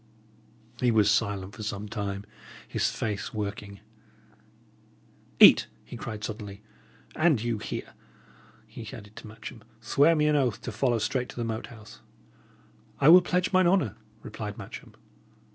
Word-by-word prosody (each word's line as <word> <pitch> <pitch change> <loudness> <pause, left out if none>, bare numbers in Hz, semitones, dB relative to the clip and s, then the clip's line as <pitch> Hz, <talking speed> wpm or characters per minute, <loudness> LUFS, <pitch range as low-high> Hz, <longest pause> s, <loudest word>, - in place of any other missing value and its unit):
He 125 - +2
was 110 -3 +4
silent 100 -3 -1
for - - -9
some 105 0 -4
time, 100 -2 -4 0.4
his - - 0
face 105 -1 -4
working. 100 -1 -5 1.6
"Eat!" - - +9 0.2
he - - -9
cried, 110 -3 -6
suddenly. 105 -2 -6 0.5
"And 155 -6 +3
you 115 -1 -2
here," - - -6 0.7
he - - -11
added 105 -1 -11
to - - -9
Matcham, 110 +2 -10 0.2
"swear 140 +8 +3
me 150 -1 +2
an 150 0 +3
oath 130 -6 +1
to 120 - -4
follow 120 +2 +1
straight 125 +3 -1
to - - -10
the 120 - -3
Moat 110 -1 -4
House." 110 -3 -13 1.0
"I 140 - +6
will 180 +2 +10
pledge 180 +2 0
mine 185 -1 +5
honour," 170 - +2 0.3
replied 105 -1 -6
Matcham. - - -10
110 Hz, 145 wpm, -27 LUFS, 105-130 Hz, 1.6 s, will